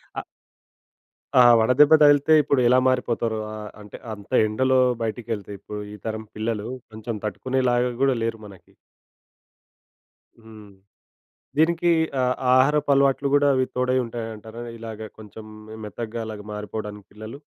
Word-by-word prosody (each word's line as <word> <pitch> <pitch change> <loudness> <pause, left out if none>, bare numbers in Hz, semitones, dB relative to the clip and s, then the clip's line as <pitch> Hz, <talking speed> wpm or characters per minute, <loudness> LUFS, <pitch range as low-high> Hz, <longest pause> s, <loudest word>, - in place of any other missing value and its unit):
అ - - -2 1.2
ఆ! - - +9 0.2
వడదెబ్బ 130 +7 +5
తగిలితే 145 +1 +5
ఇప్పుడెలా 130 -3 +3
మారిపోతారో! 120 -3 0 0.2
ఆహ్, 105 -1 -8
అంటే 105 -1 -11 0.2
అంత 100 -1 -13 0.2
ఎండలో 130 +4 +1 0.2
బయటికెళ్తే 110 -2 -4
ఇప్పుడు, 105 +2 -8
ఈ - - -8
తరం 110 0 -4
పిల్లలు 110 -1 -3 0.2
కొంచెం 110 +1 -6
తట్టుకునే 130 +6 -2
లాగా 120 +1 +1
గూడా 135 -1 +3
లేరు 115 0 -3
మనకి. 100 -3 -15 1.7
హ్మ్. 110 -2 -14 0.9
దీనికి 170 +2 +3 0.3
ఆహ్, 125 0 +1 0.2
ఆహారపు 145 +3 +3
అలవాట్లు 140 0 +2
కూడా 145 0 +3
అవి 130 -1 +1
తోడై 125 0 +1
ఉంటాయంటారా? 115 0 -8 0.2
ఇలాగ 110 -1 -8
కొంచెం 110 +1 -11 0.2
మె 110 - -9
మెత్తగా 115 +2 -6
అలాగ 110 -1 -7
మారిపోవడానికి 105 -1 -7
పిల్లలు. 110 +6 -9
115 Hz, 125 wpm, -23 LUFS, 110-130 Hz, 1.7 s, ఆ